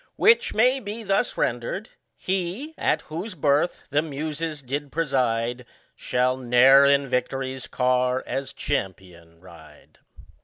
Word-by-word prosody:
Which 455 Hz, +1 st, +4 dB
may 250 Hz, +5 st, +3 dB
be 220 Hz, 0 st, -6 dB
thus 200 Hz, +4 st, 0 dB
rendered: 120 Hz, -, -2 dB, 0.3 s
He, 190 Hz, -, -3 dB
at 150 Hz, -, 0 dB
whose 180 Hz, +6 st, -6 dB
birth 145 Hz, +2 st, +1 dB
the 145 Hz, +1 st, +3 dB
Muses 155 Hz, 0 st, -5 dB
did 140 Hz, +2 st, -4 dB
preside, 125 Hz, -6 st, -1 dB, 0.3 s
Shall 125 Hz, +1 st, 0 dB
i^e'er 130 Hz, +3 st, +6 dB
iu -, -, -8 dB
victory's 130 Hz, +1 st, -3 dB
car 125 Hz, 0 st, +1 dB
as 135 Hz, +2 st, -4 dB
CHAMPION 85 Hz, -4 st, -5 dB
ride. 80 Hz, -5 st, -17 dB
135 Hz, 120 wpm, -24 LUFS, 125-165 Hz, 0.3 s, i^e'er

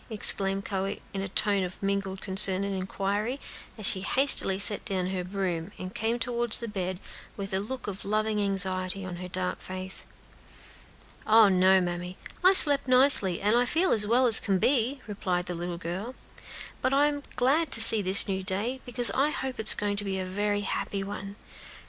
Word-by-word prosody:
exclaimed 195 Hz, -2 st, 0 dB
Chloe, 195 Hz, 0 st, -5 dB
in 195 Hz, -, -5 dB
a 195 Hz, -, -5 dB
tone 200 Hz, 0 st, 0 dB
of 180 Hz, 0 st, -8 dB
mingled 195 Hz, -1 st, -4 dB
concern 190 Hz, -1 st, +1 dB
and 200 Hz, 0 st, -4 dB
inquiry, 200 Hz, +6 st, -4 dB, 0.4 s
as 215 Hz, -, -3 dB
she 190 Hz, -, +3 dB
hastily 195 Hz, -2 st, +4 dB
set 205 Hz, +1 st, +2 dB
down 185 Hz, -1 st, -1 dB
her 185 Hz, -1 st, -4 dB
broom, 180 Hz, -2 st, -5 dB
and 185 Hz, +1 st, -9 dB
came 225 Hz, +2 st, -3 dB
toward 240 Hz, -1 st, -4 dB
the 235 Hz, -, +5 dB
bed, 185 Hz, -3 st, -5 dB, 0.4 s
with 195 Hz, -1 st, -7 dB
a 190 Hz, -, 0 dB
look 245 Hz, +5 st, -8 dB
of 200 Hz, -1 st, -8 dB
loving 215 Hz, +1 st, -2 dB
anxiety 190 Hz, -1 st, -2 dB
on 180 Hz, -2 st, -8 dB
her 180 Hz, +1 st, -9 dB
dark 180 Hz, 0 st, -5 dB
face. 185 Hz, 0 st, -6 dB, 1.2 s
"Oh, 220 Hz, -1 st, +5 dB
no, 190 Hz, 0 st, +3 dB
mammy! 180 Hz, 0 st, -6 dB, 0.3 s
I 370 Hz, +1 st, +5 dB
slept 290 Hz, -7 st, +9 dB
nicely, 255 Hz, -8 st, +5 dB
and 235 Hz, +5 st, 0 dB
feel 350 Hz, +4 st, 0 dB
as 210 Hz, -1 st, +2 dB
well 245 Hz, +4 st, +2 dB
as 225 Hz, -3 st, +9 dB
can 195 Hz, -2 st, -2 dB
be," 260 Hz, +5 st, 0 dB
replied 185 Hz, -4 st, -4 dB
the 180 Hz, -, -6 dB
little 175 Hz, 0 st, -6 dB
girl; 185 Hz, +9 st, -7 dB, 0.7 s
"but 260 Hz, -, -1 dB
I 285 Hz, +1 st, +3 dB
am 290 Hz, -1 st, -3 dB
glad 290 Hz, +6 st, 0 dB
to -, -, +9 dB
see 225 Hz, -1 st, +3 dB
this 190 Hz, 0 st, +2 dB
new 190 Hz, -1 st, -4 dB
day, 205 Hz, +8 st, -2 dB
because 245 Hz, 0 st, 0 dB
I 280 Hz, +3 st, 0 dB
hope 265 Hz, -3 st, -6 dB
it 220 Hz, -, -2 dB
is -, -, +7 dB
going 205 Hz, -1 st, -4 dB
to 205 Hz, -, -2 dB
be 195 Hz, -1 st, -5 dB
a 185 Hz, -, -5 dB
very 205 Hz, +2 st, -3 dB
happy 200 Hz, 0 st, -5 dB
one. 200 Hz, 0 st, -9 dB
200 Hz, 190 wpm, -25 LUFS, 185-230 Hz, 1.2 s, slept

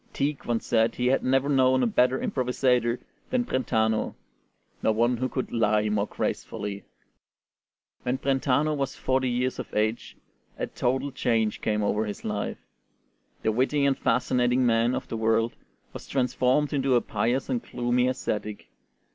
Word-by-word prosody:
Tieck 140 Hz, 0 st, -2 dB
once 120 Hz, -1 st, -1 dB
said 115 Hz, 0 st, +2 dB
he 125 Hz, -, -1 dB
had 130 Hz, +2 st, +2 dB
never 135 Hz, +1 st, +2 dB
known 130 Hz, -2 st, +3 dB
a -, -, +4 dB
better 125 Hz, +3 st, +3 dB
improvisatore 125 Hz, -2 st, +1 dB, 0.3 s
than 250 Hz, -1 st, +1 dB
Brentano, 110 Hz, -, 0 dB, 0.7 s
nor 110 Hz, -, +2 dB
one 120 Hz, +2 st, +2 dB
who 130 Hz, +2 st, -1 dB
could 130 Hz, -, -3 dB
"lie 110 Hz, -2 st, +2 dB
more 105 Hz, 0 st, 0 dB
gracefully." 105 Hz, -2 st, -4 dB, 1.2 s
When 125 Hz, +1 st, -1 dB
Brentano 135 Hz, +2 st, +1 dB
was 135 Hz, -1 st, -2 dB
forty 130 Hz, 0 st, 0 dB
years 125 Hz, +1 st, -1 dB
of -, -, -6 dB
age 110 Hz, +2 st, -1 dB, 0.4 s
a -, -, -1 dB
total 130 Hz, +3 st, -1 dB
change 115 Hz, -4 st, 0 dB
came 105 Hz, -1 st, 0 dB
over 105 Hz, +1 st, 0 dB
his 105 Hz, -, -6 dB
life. 105 Hz, -1 st, -2 dB, 0.9 s
The 110 Hz, -, +2 dB
witty 135 Hz, +5 st, +1 dB
and 140 Hz, -1 st, +3 dB
fascinating 125 Hz, 0 st, +1 dB
man 115 Hz, +1 st, +3 dB
of -, -, -4 dB
the 115 Hz, -, -4 dB
world 115 Hz, +1 st, +1 dB, 0.4 s
was -, -, -9 dB
transformed 130 Hz, +2 st, +1 dB
into 135 Hz, -2 st, +2 dB
a 120 Hz, -, +4 dB
pious 125 Hz, +3 st, -1 dB
and 245 Hz, -2 st, -1 dB
gloomy 125 Hz, -, 0 dB
ascetic. 105 Hz, -4 st, -3 dB
125 Hz, 155 wpm, -26 LUFS, 110-130 Hz, 1.2 s, a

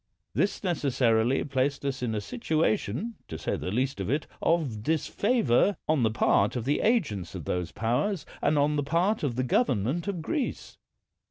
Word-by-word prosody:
This 200 Hz, -, 0 dB
necessarily 130 Hz, -, +2 dB
placed 140 Hz, 0 st, -1 dB
us 135 Hz, -2 st, -2 dB
in 115 Hz, -3 st, -1 dB
a 105 Hz, -, -1 dB
situation, 160 Hz, -, -1 dB
to -, -, -6 dB
say -, -, -2 dB
the -, -, -4 dB
least 130 Hz, +4 st, -1 dB
of 95 Hz, -, -3 dB
it, 145 Hz, +4 st, 0 dB, 0.2 s
of 150 Hz, -11 st, +1 dB
disfavor 165 Hz, -, +2 dB
on 155 Hz, -3 st, +2 dB
the 110 Hz, -, +3 dB
part 105 Hz, -1 st, +2 dB
of 120 Hz, -2 st, -3 dB
the 145 Hz, +2 st, +1 dB
agents 155 Hz, -, 0 dB
of 85 Hz, -6 st, -6 dB
those 90 Hz, 0 st, -2 dB
powers 125 Hz, -, -1 dB, 0.2 s
and 150 Hz, -, +2 dB
on 145 Hz, +1 st, +2 dB
the 145 Hz, -, +1 dB
part 170 Hz, +9 st, +1 dB
of 135 Hz, -6 st, -1 dB
the 130 Hz, -, 0 dB
government 130 Hz, -, +1 dB
of 180 Hz, -5 st, -3 dB
Greece. 285 Hz, -, -3 dB
140 Hz, 175 wpm, -28 LUFS, 115-170 Hz, 0.2 s, the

